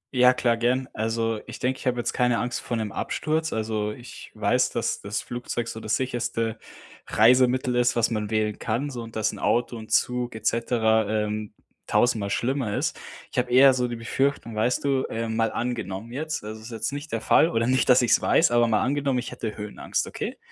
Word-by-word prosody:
Ja, 125 0 +7
klar, 120 -2 +1
gern. 125 +2 +1
Also, 115 0 -1
ich - - -7
denke, 130 +1 -1
ich - - -6
habe 125 - +1
jetzt 120 - -2
keine 125 -1 +2
Angst 120 0 -2
vor 120 - -3
'nem 110 -2 -3
Absturz. 160 +1 -1
Also, 110 -1 -2
ich 120 +2 -11
weiß, - - +2
dass - - -2
das 100 +1 -3
Flugzeug 120 -1 -4
so 110 - -6
das 110 0 -1
sicherste 115 -3 -2 0.5
Reisemittel 125 +2 +4
ist, 120 0 +2
was 120 0 +2
man 105 -2 -2
wählen 110 -1 0
kann, 125 +6 -2
so 120 -2 -5
und 115 -1 -10
dass 110 0 +1
'n - - -9
Auto 120 +1 +1
und 110 -1 -9
Zug 125 -2 +1
et 110 0 -9
cetera, 110 -2 +2
ähm, 105 0 -4 0.3
tausendmal 110 -5 +2
schlimmer 120 0 -1
ist. - - -1 0.4
Ich - - 0
habe 125 0 -1
eher 130 +1 +7
so 125 -1 0
die 120 - -4
Befürchtung, 115 0 -1
weißt 120 +5 +1
du, 135 -2 +2
ähm, 115 0 -3
mal 115 0 +1
angenommen 115 -3 -4
jetzt 155 -2 -3
also, 110 +1 -7
es 110 - -10
ist - - -10
jetzt 115 +2 -3
nicht 145 +2 -6
der - - -1
Fall 160 - +4
oder 115 0 0
nicht, 130 -1 +2
dass 125 0 +6
ich's 120 -1 +4
weiß, 160 - +3
aber 120 0 +4
mal 110 -2 +2
angenommen, 140 -1 0
ich 120 - -4
hätte 110 -2 -5
Höhenangst, 105 -1 -3
okay? - - -5
120 Hz, 215 wpm, -25 LUFS, 110-125 Hz, 0.5 s, Ja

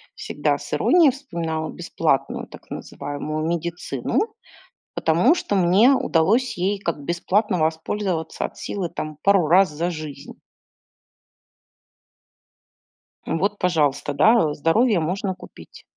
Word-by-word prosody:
всегда - - -1
с - - -9
иронией 335 -6 +5
вспоминала 165 - -4
бесплатную 165 -5 -1
так - - -15
называемую 155 +2 -5
медицину. 170 - -2 0.6
Потому 170 - +3
что 275 - -2
мне 195 +7 +5
удалось 225 +1 +1
ей 195 +3 0
как 170 -6 -3
бесплатно 185 +4 0
воспользоваться 160 +2 -2
от - - -5
силы 185 -4 -4
там 155 -1 -6
пару 195 -4 +4
раз 185 +3 +5
за 165 +4 -2
жизнь. 155 -4 -8 2.9
Ну 165 - -1
вот, 200 +4 0
пожалуйста, 145 -6 0
да, 155 +1 +4
здоровье 195 - +2
можно 185 +4 -2
купить. 180 - -14
175 Hz, 115 wpm, -22 LUFS, 160-205 Hz, 2.9 s, иронией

